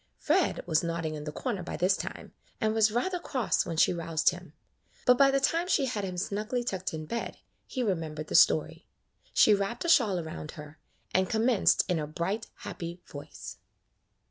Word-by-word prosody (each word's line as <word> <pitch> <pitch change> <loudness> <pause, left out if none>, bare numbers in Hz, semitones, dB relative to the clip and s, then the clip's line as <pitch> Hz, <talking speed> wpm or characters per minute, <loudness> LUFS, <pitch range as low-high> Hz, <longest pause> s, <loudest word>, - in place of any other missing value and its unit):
Fred 345 +4 +1
was 160 -3 +2
nodding 165 -2 -2
in 150 -1 -6
the 150 - -4
corner 205 - -3
by 175 - -5
this 185 +2 +3
time, - - -7 0.3
and 215 0 +1
was 220 -1 +3
rather 355 - -1
cross 255 - 0
when 165 -2 -4
she - - +4
roused 165 -1 +1
him, 175 -3 -11 0.5
but 250 - +6
by 275 +2 +5
the 275 0 +2
time 330 +5 +1
she 295 -6 +2
had 225 -6 -3
him 185 -2 -4
snugly 215 +7 -2
tucked 190 -5 -3
in 155 -1 -5
bed 235 +8 -4 0.3
he 255 - -2
remembered 160 -7 -2
the - - -7
story. - - +3 0.4
She 215 - +6
wrapped 200 +8 -1
a - - 0
shawl 215 - +4
around 160 -2 -7
her, 150 0 -11 0.3
and 185 0 +2
commenced 225 -1 +3
in 180 -4 0
a 150 - -3
bright, 190 +8 -3
happy 175 -3 -6
voice. 145 0 -9
190 Hz, 190 wpm, -29 LUFS, 165-240 Hz, 0.5 s, but